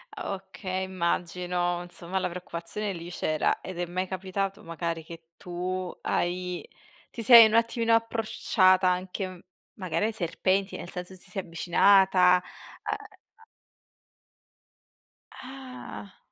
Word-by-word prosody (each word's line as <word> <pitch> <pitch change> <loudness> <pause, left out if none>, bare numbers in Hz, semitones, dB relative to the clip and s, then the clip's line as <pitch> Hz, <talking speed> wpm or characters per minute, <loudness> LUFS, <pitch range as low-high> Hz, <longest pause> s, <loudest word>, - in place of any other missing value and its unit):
Ah, - - -4
okay, 190 -1 -5
immagino, 175 -1 -1
insomma 175 +1 -5
la 185 -1 -1
preoccupazione 180 +3 -5
lì 170 -1 -7
c'era. 155 -3 0
Ed 185 -2 -7
è 175 - 0
mai 185 +2 -3
capitato 190 +1 -3
magari 165 0 -4
che 165 0 -12
tu 180 +1 -4
hai 180 0 -2 0.4
ti 230 - -6
sei 230 0 +10
un 215 - -3
attimino 230 0 +2
approcciata 215 -4 +3
anche 185 0 -3 0.3
magari 185 +1 -1
ai 225 - 0
serpenti, 190 +1 0
nel 175 - -8
senso 180 +1 -7
ti 185 +1 -11
sei 190 0 -4
avvicinata, 180 +1 +4 0.5
uhm, - - 0 0.4
a - - -21 1.9
Ah. 255 -6 -10
185 Hz, 120 wpm, -27 LUFS, 175-195 Hz, 1.9 s, sei